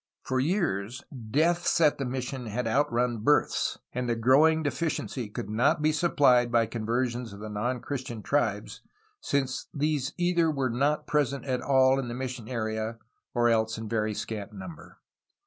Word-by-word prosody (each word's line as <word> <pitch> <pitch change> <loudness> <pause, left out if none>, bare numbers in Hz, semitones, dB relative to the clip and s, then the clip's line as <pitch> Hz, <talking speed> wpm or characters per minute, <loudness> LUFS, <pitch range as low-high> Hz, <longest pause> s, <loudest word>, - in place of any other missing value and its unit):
For 130 0 -1
years, 130 - -1 0.3
deaths 170 +7 +2
at 150 -4 +4
the 135 - -1
missions 125 -1 -4
had 120 +3 -2
outrun 120 -1 +1
births, 145 +8 +2 0.2
and 125 0 -2
the 120 - +1
growing 145 +7 +4
deficiency 145 -6 -2
could - - -5
not 115 +7 +2
be 155 - +4
supplied 140 -7 +3
by 115 -1 +4
conversions 120 0 -2
of 100 - -10
the 110 +1 -7
non 120 +4 -2
Christian 125 -6 -5
tribes, 110 -7 -1 0.4
since 135 - -1
these 145 -2 0
were - - -20
either 165 -7 +1
not 140 +5 +1
present 140 -2 0
at 130 -2 -1
all 130 0 +4
in 130 - -3
the 120 - -5
mission 125 -3 -5
area 110 -1 -3 0.4
or 120 0 +3
else 110 -1 +1
in 110 0 -6
very 110 -1 -1
scant 110 -1 -5
number. 95 -5 -10
125 Hz, 165 wpm, -28 LUFS, 115-140 Hz, 0.4 s, at